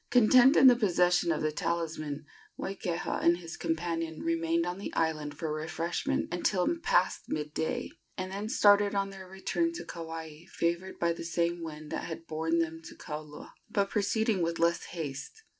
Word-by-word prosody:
Content 250 +4 +6
in - - +7
the 250 -2 +9
possession 180 -5 +3
of 155 -1 -1
the 155 - +1
talisman, 155 -2 -3 0.3
Moikeha 180 -3 -3
and 170 0 +4
his 170 -1 -8
companion 165 -1 -2
remained 165 0 +1
on 180 +2 -3
the 200 - -5
island 155 -3 -1
for 155 -1 -2
refreshment 160 +2 -2
until 180 - +1
past 475 +7 +2
midday, 150 +1 -2 0.3
and 185 0 -4
then 205 +3 -4
started 205 -4 +5
on 195 0 0
their 190 -1 -10
return 190 - -1
to 340 - -6
Kauai, 165 -1 -7
favored 170 +3 -1
by 170 0 +1
the 165 - -7
same 170 +1 0
winds 155 -2 -7
that - - -3
had 165 0 -6
borne 160 +1 -1
them 165 -1 -1
to - - -10
Kaula, 150 -1 -8 0.2
but 200 -1 0
proceeding 220 -1 +1
with 165 0 0
less 170 0 +2
haste. 155 - -6
170 Hz, 170 wpm, -30 LUFS, 160-195 Hz, 0.3 s, the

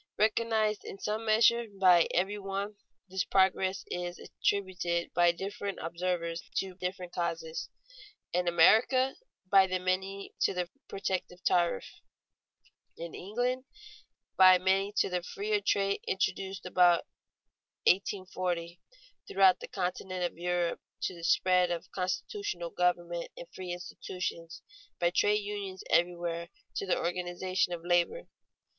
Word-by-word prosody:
_ - - -36
Recognized 215 0 +1
in - - -8
some 215 +3 -3
measure 230 +2 +4
by 180 -3 +6
every 195 +4 0
one, 200 +1 -4 0.3
this 190 0 -1
progress 190 0 +2
is 175 0 -3
attributed 180 -4 -1
by 175 0 +5
different 195 +2 -5
observers 170 0 -2
to 190 -1 -1
different 180 -1 -5
causes: 165 -2 -3 0.6
in 180 0 +1
America, 225 +10 +5 0.3
by 190 0 +5
many 185 +2 -2
to - - +2
the 180 -1 -1 0.2
protective 185 -2 -3
tariff; 170 - +2 1.1
in 170 0 -7
England, 245 +6 -2 0.7
by 185 -1 +8
many 190 +2 +1
to - - +2
the 180 -1 -1
freer 415 - -2
trade 200 - +1
introduced 190 0 -2
about 180 -1 +4 0.8
1840; 180 -3 0 0.5
throughout 190 -1 +5
the - - -7
continent 185 -1 -3
of 175 - -2
Europe, 175 0 -1 0.2
to - - -1
the 170 -1 -11
spread 180 +1 +3
of 175 -1 -4
constitutional 185 - -3
government 175 -1 0
and 170 - -8
free 185 -1 -6
institutions; 175 -1 -6 0.3
by 175 0 +2
trade 210 +3 +2
unions 200 -2 -5
everywhere, 170 -1 +1 0.3
to 195 - -2
the - - +2
organization 180 +1 -1
of 170 -1 -5
labor. 175 - +1
185 Hz, 125 wpm, -30 LUFS, 175-195 Hz, 1.1 s, by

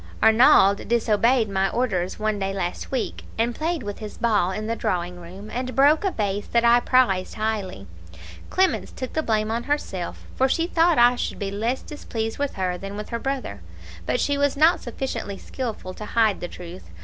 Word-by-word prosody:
"Arnauld 220 -3 +6
disobeyed 230 +1 +2
my 195 -1 0
orders 190 -8 -1
one 215 -1 -1
day 195 0 -2
last 175 -2 -3
week, 260 -3 -3
and 230 +2 +1
played 320 +1 -2
with 205 -1 -6
his 215 -2 -8
ball 210 -6 +2
in 215 +3 -4
the 230 +1 -1
drawing 175 -4 -2
room, 190 +5 -10
and 255 +2 -3
broke 290 +5 +5
a 390 - +2
vase 205 - -2
that 235 0 +2
I 235 +1 +6
prized 240 -8 +2
highly. 210 - -3 0.6
Clemence 375 0 +1
took 255 - -6
the 315 - +1
blame 215 -5 0
on 235 +1 -2
herself, 245 -11 -3
for 265 +1 +2
she 330 +5 +1
thought 340 -1 +3
I 240 +1 +6
should - - -3
be 200 -2 -3
less 230 +6 -2
displeased 225 -6 -5
with 285 -1 -2
her 180 -2 -2
than 195 +1 -7
with 210 - -6
her 235 - -3
brother; 260 - -4 0.5
but - - +1
she 285 0 0
was 285 0 +1
not 325 +3 +4
sufficiently 240 -5 -4
skilful 220 -8 -5
to 210 - -8
hide 220 -2 +2
the 175 - -4
truth. 175 - -10
220 Hz, 195 wpm, -24 LUFS, 195-255 Hz, 0.6 s, Arnauld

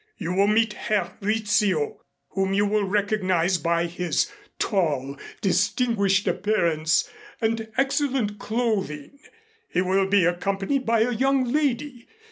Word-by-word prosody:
You 175 -2 -3
will 195 +2 +3
meet 220 0 +2
Herr 215 -1 -2
Rizzio, 205 -6 0 0.3
whom 195 0 -1
you 205 +1 +3
will 205 0 +1
recognize 190 -3 +1
by 170 0 +1
his 175 - -1 0.3
tall, 145 - 0 0.3
distinguished 200 +1 +1
appearance 165 -7 +1 0.3
and 225 0 -1
excellent 270 -6 0
clothing. 215 - -2 0.5
He 180 - +1
will 190 +1 +2
be 195 -2 +3
accompanied 195 +9 -1
by 230 -1 +3
a 240 +2 +2
young 265 +3 +2
lady. 285 -4 -1
205 Hz, 120 wpm, -24 LUFS, 180-230 Hz, 0.5 s, will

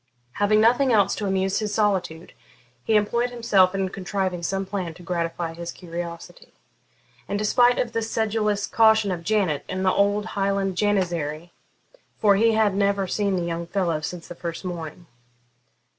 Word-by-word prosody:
Having 205 +7 +2
nothing 245 +4 +4
else 200 -3 +3
to 205 - -3
amuse 190 0 0
his 210 -2 -3
solitude, 190 -6 -1 0.5
he 220 - +1
employed 235 +4 +1
himself 205 -6 +2
in 190 -1 -1
contriving 185 -1 -3
some 195 +3 -2
plan 185 -4 -4
to 180 - -14
gratify 170 -1 -3
his 170 +1 -6
curiosity, 175 - -8 0.7
in 200 - -2
despite 240 +4 +3
of 235 - -1
the 230 - 0
sedulous 215 -2 -1
caution 220 -2 +3
of 175 -2 -3
Janet 190 -7 0
and 185 +1 -2
the 185 - +3
old 205 +1 +1
Highland 195 -1 0
janizary, 175 -5 -1 0.7
for 205 -2 +4
he 225 +3 +3
had 215 -2 +2
never 200 0 +1
seen 200 +1 0
the 175 - -1
young 170 0 -4
fellow 170 -4 -1
since 170 +2 -6
the - - -8
first 170 +1 -6
morning. 170 -1 -6
195 Hz, 160 wpm, -24 LUFS, 175-210 Hz, 0.7 s, nothing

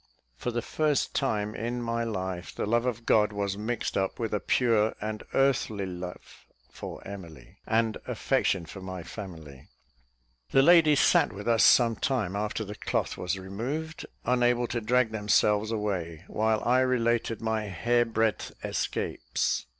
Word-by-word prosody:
For 60 - -3
the 120 -1 -2
first 150 -1 0
time 105 0 0
in 120 +2 -3
my 115 0 -1
life, 95 -5 -4
the - - -2
love 120 +3 +1
of 115 -2 -3
God 105 -1 +4
was 100 -1 -2
mixed 110 +3 -3
up 95 -1 0
with 115 -2 -3
a 105 - +1
pure 110 -3 +2
and 110 0 -4
earthly 125 -7 +2
love 90 -1 -8 0.2
for - - -8
Emily, 85 -9 -10
and 110 0 +1
affection 90 -4 0
for 95 +4 -10
my 95 -2 -6
family. 80 -9 -9 0.8
The 135 - +5
ladies 155 -3 +6
sat - - +4
with 100 +2 -8
us 115 -1 +4
some 115 -3 +5
time 115 -8 -1
after 105 +1 -2
the 105 - -6
cloth - - -2
was 90 +2 -2
removed, 125 +12 -5 0.2
unable 120 0 +2
to 120 - -2
drag 120 +1 +2
themselves 105 0 +2
away, 95 -7 -3
while 110 0 0
I 125 +2 +3
related 120 -3 +1
my 110 -1 -1
"hair 120 +6 +1
breadth 110 -3 -1
escapes." - - -2
110 Hz, 155 wpm, -28 LUFS, 100-120 Hz, 0.8 s, ladies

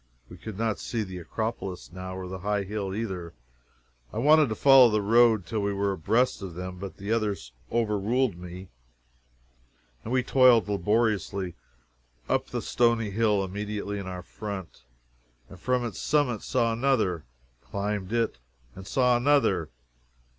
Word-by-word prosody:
We - - -11
could 110 -3 -8
not 110 -1 -1
see 115 -2 -2
the 95 -2 -7
Acropolis 95 0 -4
now 95 +1 -7
or 95 -1 -6
the 95 +1 -6
high 100 +1 -1
hill, 100 0 -4
either, 95 -6 -4
and - - -14 0.8
I - - -7
wanted 150 +3 +5
to 110 - -2
follow 135 0 +7
the 105 -1 +1
road 110 -1 +4
till 110 +5 -2
we 100 0 0
were 100 0 0
abreast 110 +8 +1
of 95 -4 -7
them, 90 0 -6
but 95 0 -7
the 100 +2 -5
others 105 - -1 0.2
overruled 115 +1 +1
me, 90 +2 -9 1.3
and 115 - -6
we 130 0 +2
toiled 125 -4 +5
laboriously 100 -2 0 0.7
up - - 0
the - - -4
stony 115 -3 +1
hill 105 -1 +2
immediately 105 +1 -4
in 95 - -6
our 90 -1 -6
front 95 - -7 0.6
and 95 - -12
from 125 +4 0
its 115 - -5
summit 145 -7 +1
saw 115 -3 +1
another 115 - +1 0.4
climbed 100 - -3
it 115 - 0 0.3
and 95 +1 -11
saw 125 -2 +3
another! 120 - +2
105 Hz, 155 wpm, -27 LUFS, 95-115 Hz, 1.3 s, follow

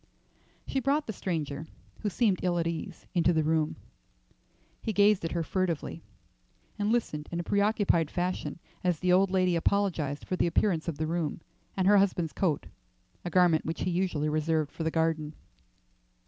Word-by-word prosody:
She 270 - -1
brought 285 +4 +1
the 220 - -4
stranger, 155 -5 -3 0.3
who 210 - -1
seemed 200 -1 +2
ill 175 -1 +1
at 170 - 0
ease, 165 -1 -5
into 175 -1 +3
the 160 -1 +2
room. 155 0 +1 1.1
He 220 - -2
gazed 205 -1 +4
at 165 - -2
her 170 -1 0
furtively, 170 -2 -2 0.8
and 205 +1 +1
listened 155 -11 -1
in 170 - -2
a - - -2
preoccupied 200 -5 +2
fashion 180 +1 -2 0.3
as 180 -3 +2
the 180 -1 +2
old 190 +1 +4
lady 185 -2 +2
apologized 165 -6 0
for 185 - -2
the 180 - +1
appearance 170 -1 +1
of 165 -4 -2
the 155 - -1
room, 160 -2 -2 0.4
and 190 -1 +2
her 205 0 +7
husband's 175 -6 +1
coat, 160 -5 0 0.6
a 175 - -3
garment 175 -2 +4
which 160 +1 -4
he 180 - 0
usually 170 -4 0
reserved 155 -1 0
for 165 - -5
the 160 - +1
garden. 160 -2 0
175 Hz, 175 wpm, -29 LUFS, 160-190 Hz, 1.1 s, her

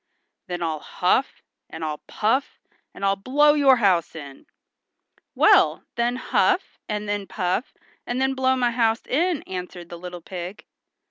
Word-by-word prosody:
"Then 175 -1 -4
I'll 160 -2 -2
huff, 185 - 0 0.3
and 160 0 -6
I'll 150 -1 -4
puff, 245 +6 0 0.4
and 200 - -3
I'll 195 0 +3
blow 285 +9 +3
your 280 -3 +5
house 190 -10 +2
in." 140 -4 -10 0.9
"Well, - - +5
then 235 +1 0
huff, 375 +8 0
and 210 0 -3
then 205 -1 -2
puff, 185 +5 -2 0.4
and 245 +1 -2
then 265 0 +1
blow 260 0 +2
my 245 -2 +1
house 230 -1 +1
in," 335 +3 0
answered 180 -2 -7
the 175 0 -8
pig. 180 +2 -7
210 Hz, 145 wpm, -24 LUFS, 180-260 Hz, 0.9 s, your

